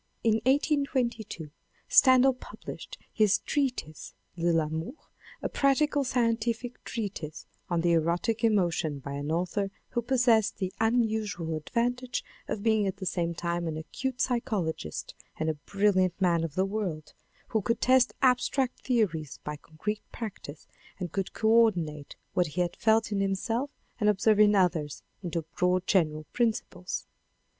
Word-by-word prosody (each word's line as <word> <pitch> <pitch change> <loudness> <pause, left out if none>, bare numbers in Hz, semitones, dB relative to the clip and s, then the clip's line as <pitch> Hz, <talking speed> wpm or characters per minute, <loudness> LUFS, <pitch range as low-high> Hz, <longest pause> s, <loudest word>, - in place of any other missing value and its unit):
In 225 -1 +3
1822 260 - 0 0.4
Stendhal 260 0 +6
published 255 - -9 0.2
his 215 -2 +4
treatise, 255 - -3 0.2
De 170 0 +1
l'Amour, 160 - -1 0.5
a - - +1
practical 285 +1 +2
scientific 235 -1 -1
treatise 190 -9 -5 0.2
on 170 -2 +1
the 170 0 +2
erotic 170 +8 +1
emotion 175 -9 +2
by 140 +1 -7
an 145 +2 -3
author 180 +4 0 0.2
who 240 - -1
possessed 235 -4 +3
the 185 -2 -3
unusual 220 -7 0
advantage 245 +9 -1 0.2
of 200 - -3
being 220 -3 +3
at 190 - -3
the 195 - -6
same 170 -2 -1
time 170 0 -2
an 155 -1 -3
acute 250 +11 -4
psychologist 195 - -2 0.2
and 160 0 0
a 150 -2 -10
brilliant 190 -3 +2
man 170 -3 +2
of 160 -3 -4
the 190 - +2
world, 195 -7 -4 0.4
who 220 - +1
could 230 +4 0
test 255 -1 +4
abstract 255 0 +2
theories 180 - 0
by 150 - -4
concrete 165 +8 -5
practice 190 -10 -7 0.3
and 180 -4 -4
could 195 0 -2
co 220 - -1
ordinate 175 -11 +2 0.2
what 180 -1 +2
he 160 +4 -2
had 175 -1 -1
felt 220 0 +2
in 205 - 0
himself 210 +7 -1 0.3
and 210 -2 +3
observe 210 +1 +3
in 210 0 +6
others 170 -6 +1 0.2
into 170 -3 -3
broad 180 0 +2
general 155 -6 +1
principles. 225 -6 -1
200 Hz, 145 wpm, -28 LUFS, 170-235 Hz, 0.5 s, Stendhal